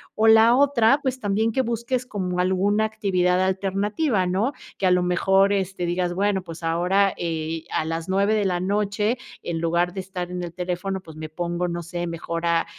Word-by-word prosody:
o 220 +1 +3
la 225 +2 +7
otra, 275 -1 +4
pues, 260 -1 -1
también 215 +1 0
que 260 - +1
busques, 235 +2 -2
como 185 -6 -3
alguna 195 +4 +2
actividad 185 -4 +1
alternativa, 195 +5 0
¿no?, 200 +10 0 0.3
que 190 - +2
a - - +4
lo 180 0 +3
mejor, 195 +3 +3
este, 190 -2 -2
digas, 175 0 -1
bueno, 200 0 +1
pues 165 -1 -10
ahora, 180 +4 +2
eh, 160 -1 -3
a - - 0
las 165 0 -3
9, 200 +3 +2
de 210 -2 +1
la 180 -2 0
noche, 210 +4 0 0.3
en 165 -1 -3
lugar 170 +2 0
de 195 - -5
estar 180 -1 -5
en 180 0 -4
el 170 -1 -6
teléfono, 180 +2 -3
pues, 160 -4 -13
me 155 - -6
pongo, 175 +2 -2
no 175 0 -4
sé, 175 +1 -4
mejor 170 0 -4
a 170 -1 +2
190 Hz, 195 wpm, -23 LUFS, 175-210 Hz, 0.3 s, la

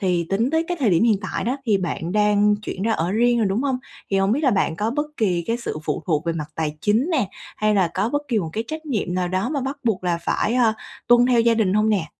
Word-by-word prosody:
Thì 180 -4 0
tính 225 +6 +1
tới 320 +1 +1
cái 355 - -1
thời 230 -7 +3
điểm 170 +4 +3
hiện 215 -4 +3
tại - - -4
đó 250 +4 0
thì 205 -4 +3
bạn 175 -1 -3
đang 210 0 +3
chuyển 200 -2 -6
ra 225 +1 +1
ở 170 -2 -1
riêng 240 +2 +3
rồi, 220 - +2
đúng 200 +7 0
hông? 265 -3 0 0.3
Thì 195 - +2
hông 195 +2 +2
biết 285 - +1
là 265 - +5
bạn 190 -5 0
có 215 +4 -1
bất 295 +3 -1
kỳ 180 -6 0
cái 230 - 0
sự 235 -9 -5
phụ - - -2
thuộc 160 -1 0
về 165 - +1
mặt 150 -2 -5
tài 155 -1 -2
chính 220 - +2
nè, 260 - +1 0.3
hay 215 0 +1
là 185 -4 +3
có 195 +4 0
bất 290 +4 -1
kỳ 230 -4 +1
một 165 -4 -3
cái 225 - -2
trách 315 +3 -6
nhiệm 210 -10 -2
nào 180 -1 0
đó 190 +6 -1
mà 285 -2 -2
bắt 270 +2 -3
buộc 195 -5 0
là 170 -1 0
phải, 215 +6 -1
ơ, 235 -3 +3 0.3
tuân 240 +1 +5
theo 245 -2 +4
gia 230 0 +3
đình 205 -4 +1
hông 215 +1 +3
nè? 195 -7 +1
210 Hz, 290 wpm, -22 LUFS, 185-240 Hz, 0.3 s, là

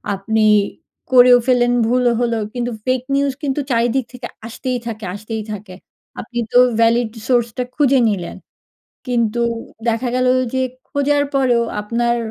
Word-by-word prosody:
আপনি 220 +3 0 0.7
করেও 245 -1 +7
ফেললেন, 245 -1 +3
ভুলও 245 0 +2
হলো। 235 -1 0 0.2
কিন্তু 245 0 -3
ফেইক 255 -1 0
নিউজ 280 -1 +1
কিন্তু 280 +1 -1
চারিদিক 240 +2 +1
থেকে 245 -1 -7 0.2
আসতেই 250 +2 -3
থাকে, 220 -1 -6
আসতেই 215 +1 -5
থাকে। 200 -2 -9 0.4
আপনি 240 +2 -5
তো - - +3 0.2
ভ্যালিড 230 0 +3 0.2
সোর্সটা 240 -1 +1
খুঁজে 275 -2 +3
নিলেন। 185 -4 -4 0.7
কিন্তু 235 -2 0 0.5
দেখা 230 +2 0
গেল 255 0 +1 0.3
যে 260 - +1 0.3
খোঁজার 285 0 +1
পরেও 250 -3 +3 0.2
আপনার, 235 +3 0
240 Hz, 135 wpm, -18 LUFS, 230-255 Hz, 0.7 s, করেও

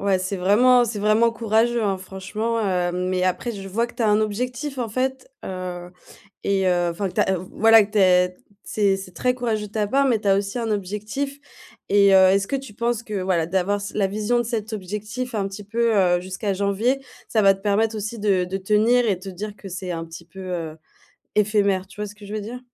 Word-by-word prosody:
ouais, 195 -2 +2
c'est 185 +1 -3
vraiment 240 +6 +5
c'est 210 -1 -4
vraiment 215 +3 +3
courageux, 230 +1 +1
hein, 195 -2 0
franchement, 195 +5 -3
heu 180 -2 0
mais 180 0 -1
après, 185 +6 -1
je 195 -2 -7
vois 230 +5 0
que 240 - -15
tu 240 - -2
as 215 - +3
un 210 +1 +4
objectif, 250 +6 -3
en 235 -2 -2
fait, 260 +3 -2
heu 180 -1 -6 0.5
et 195 -1 +1
heu, 175 -1 +2
enfin, 195 +4 -2
que 180 - -9
tu - - +2
as 190 -1 +1
voilà 220 +4 +4
que 210 - -17
tu 210 - +1
as 180 -1 +4 0.3
c'est 200 -2 +1
c'est 185 -2 -9
très 250 +9 +1
courageux 225 -4 -2
de - - -21
ta 210 -1 -1
part, 275 +5 +2
mais 235 -5 +2
tu 205 - -4
as 195 - +5
aussi 200 +4 -2
un 225 -1 -2
objectif 210 +8 -3 0.5
et 200 -1 +5
heu, 190 0 +7
est-ce 195 0 +1
que 275 - 0
tu 265 -6 -9
penses 235 +1 -1
que, 210 -4 -4
voilà, 180 -3 +1
d'avoir 190 +3 0
c 200 - -6
la 200 -2 +2
vision 215 +4 0
de - - +1
cet 220 -2 -3
objectif 215 +5 -5
un 200 -3 -1
petit 200 +1 -8
peu, 230 +2 +1
heu, 175 -2 +3
jusqu'à 190 +3 -3
janvier, 200 +7 0 0.3
ça 220 - +2
va 195 -1 +6
te 195 - -13
permettre 215 +2 +1
aussi 215 +2 -4
de 195 -3 +2
de 185 +2 -3
tenir 220 +5 +3
et 200 -4 +1
te 190 +2 -9
dire 205 +3 -6
que 195 - -10
c'est 185 0 -5
un 165 -1 -3
petit 165 +1 -11
peu, 190 +3 -11
heu, 170 -4 -4 0.6
éphémère? 200 -2 +2
Tu 195 - -17
vois 210 - -2
ce 205 - -10
que 210 -1 -13
je 210 - -6
veux 215 - -3
dire? 240 +4 -7
205 Hz, 240 wpm, -23 LUFS, 190-225 Hz, 0.6 s, heu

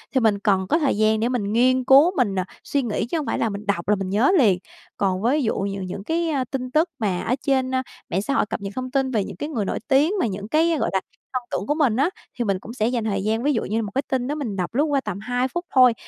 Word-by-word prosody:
thì - - +5
mình 220 -4 +2
cần 195 -2 +1
có 320 - +3
thời 280 -9 +1
gian 215 0 +3
để 230 +2 +1
mình 215 -5 -1
nghiên 255 +2 +3
cứu, 280 +7 +6
mình, 210 -7 +2
ờ, 185 - +1 0.2
suy 285 - 0
nghĩ 215 -2 -1
chứ 290 +8 -2
hông 305 - -2
phải - - -1
là 225 - +1
mình 200 +1 -6
đọc 200 -4 -1
là 210 - +5
mình 190 -1 -4
nhớ 215 - +3
liền. 200 - +4 0.4
Còn 190 -1 0
ví 280 +5 +2
dụ 225 - +1
nh 195 -1 -3
những 190 +2 -6
cái, 330 +7 0
ơ, 280 -4 0
tin 255 -2 -3
tức 315 +4 +2
mà 190 -5 0
ở 250 - 0
trên, 260 -2 +1
a, 260 - +1 0.3
mạng 190 - 0
xã 275 +7 -2
hội - - +2
cập 205 - -5
nhật 200 0 -5
thông 255 0 -4
tin 270 -1 +1
về 215 -4 +1
những 195 - -7
cái 295 - -5
người 225 -9 -2
nổi - - -2
tiếng 290 +6 +3
mà 345 - +2
những 200 0 -5
cái, 325 +4 +2
gọi - - 0
là, 190 - +2 0.3
thông 255 - -1
tưởng 200 - -2
của 295 - +1
mình 275 -8 +2
á, 280 +7 +2 0.3
thì 240 - +1
mình 195 -2 0
cũng 225 +4 -9
sẽ 220 -2 0
dành 240 -2 -1
thời 195 -3 -1
gian, 220 +2 0
ví 290 +1 +2
dụ 230 - 0
như 215 - -2
là - - +1
một 210 -2 -5
cái 270 - +2
tin 250 -2 0
đó 295 - -2
mình 245 -9 -4
đọc 185 +2 -3
lướt 285 - +3
qua 285 -3 +1
tầm 210 -6 -5
2 245 +4 -1
phút 345 +6 -4
thôi. 255 -2 +7
240 Hz, 310 wpm, -23 LUFS, 200-270 Hz, 0.4 s, thôi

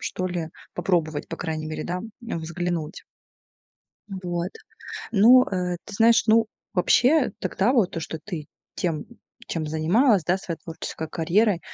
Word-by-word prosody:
что 185 - -3
ли, 175 -3 -3 0.3
попробовать, 165 -4 0
по 165 - -5
крайней 155 -2 -3
мере, 155 - -4
да, 180 +1 -3 0.2
взглянуть. 170 -4 -4 1.1
Вот, 180 -2 -3 0.6
ну, 240 +5 +7
э, 180 -2 -2
ты 210 - -9
знаешь, 230 +2 +5
ну, 225 0 +5 0.3
вообще 250 - +4
тогда 195 +6 +1
вот 220 -9 +2
то, 165 - -3
что 160 0 -5
ты 165 -8 -5 0.3
тем, 165 -4 -2 0.4
чем 160 -2 -3
занималась, 175 - +3
да, 180 +3 +1
своей 170 -3 -5
творческой 160 -1 -6
карьерой. 175 +4 +2
180 Hz, 140 wpm, -25 LUFS, 165-210 Hz, 1.1 s, ну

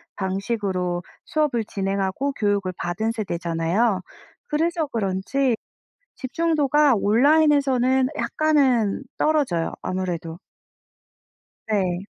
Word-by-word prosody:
방식으로 190 -2 -2 0.2
수업을 295 -7 0
진행하고 195 +7 -2
교육을 205 -6 0
받은 175 +6 -2
세대잖아요. 185 +1 0 0.5
그래서 325 +2 0
그런지 230 +3 0 0.6
집중도가 295 -1 +2
온라인에서는 265 +2 +3
약간은 270 -8 +2
떨어져요 285 - +1
아무래도. 175 -3 -4 1.3
네. 190 -3 0
220 Hz, 240 characters per minute, -23 LUFS, 190-280 Hz, 1.3 s, 온라인에서는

